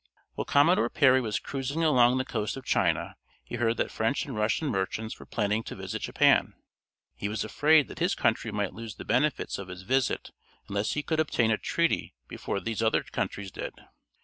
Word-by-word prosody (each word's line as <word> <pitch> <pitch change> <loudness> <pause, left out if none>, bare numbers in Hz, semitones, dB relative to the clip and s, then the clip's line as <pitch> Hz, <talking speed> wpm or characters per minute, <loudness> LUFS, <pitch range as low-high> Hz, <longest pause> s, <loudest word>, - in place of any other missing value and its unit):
While - - -4
Commodore 145 -4 +4
Perry 130 -1 +4
was 110 -4 -1
cruising 140 +4 -3
along 125 -5 +5
the 130 - -1
coast 110 +1 -3
of 130 - -9
China 85 -5 +1 0.3
he 120 - -6
heard 115 0 +1
that - - -1
French 115 +6 0
and 135 - -6
Russian 110 +8 0
merchants 105 +2 -3
were - - -12
planning 105 0 0
to - - -6
visit - - -5
Japan. - - +3 0.6
He 100 - -4
was 110 +1 -2
afraid 155 -1 +4
that - - -10
his 175 +2 +1
country 110 0 0
might 105 -2 -2
lose 115 -1 -8
the - - -9
benefits 130 0 0
of 100 - -7
his 90 +1 -9
visit 130 +5 0 0.4
unless 100 +2 -1
he 150 - -2
could 160 +1 -1
obtain 120 -7 +2
a 110 - +2
treaty 170 - 0
before - - -4
these 115 +1 -3
other 110 -1 +2
countries 100 -2 -4
did. - - -6
115 Hz, 195 wpm, -28 LUFS, 105-140 Hz, 0.6 s, along